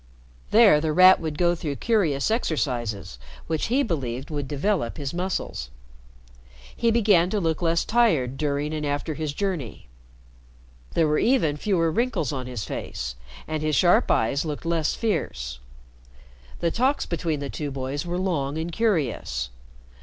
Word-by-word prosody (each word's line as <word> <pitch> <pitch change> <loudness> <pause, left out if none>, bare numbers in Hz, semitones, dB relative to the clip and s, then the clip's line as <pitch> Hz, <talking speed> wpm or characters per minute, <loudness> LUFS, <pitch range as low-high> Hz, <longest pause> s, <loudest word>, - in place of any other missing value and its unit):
There 210 -9 +6
The 160 -1 0
Rat 185 +3 +7
would 155 -2 -4
go 175 -1 +3
through 155 -4 -4
curious 180 - +1
exercises 120 - -2 0.3
which 160 -1 -1
he 265 +5 +2
believed 135 - -3
would 145 -2 -3
develop 150 - -1
his 140 0 -4
muscles. 175 - -3 1.1
He 235 - +1
began 205 -6 +4
to 210 - 0
look 165 -3 -1
less 170 0 +1
tired 165 - +2
during 145 +1 -1
and 155 -1 -3
after 145 +2 -2
his 155 -1 -3
journey. 145 - -4 1.1
There 165 - +3
were 150 0 +2
even 230 - +2
fewer 165 0 +1
wrinkles 210 - 0
on 130 -2 -4
his 125 -5 -4
face, 60 -1 -5 0.3
and 155 -1 -2
his 155 -1 0
sharp 175 +3 +4
eyes 135 +6 +2
looked 155 0 -5
less 165 -2 0
fierce. 65 - -2 1.0
The 170 - +1
talks 260 - +1
between 165 -3 -2
the 140 -1 -5
two 150 -2 -4
boys 135 +1 -3
were 175 0 -3
long 160 -6 -1
and 165 +2 -3
curious. 135 - -1
155 Hz, 155 wpm, -25 LUFS, 140-185 Hz, 1.1 s, Rat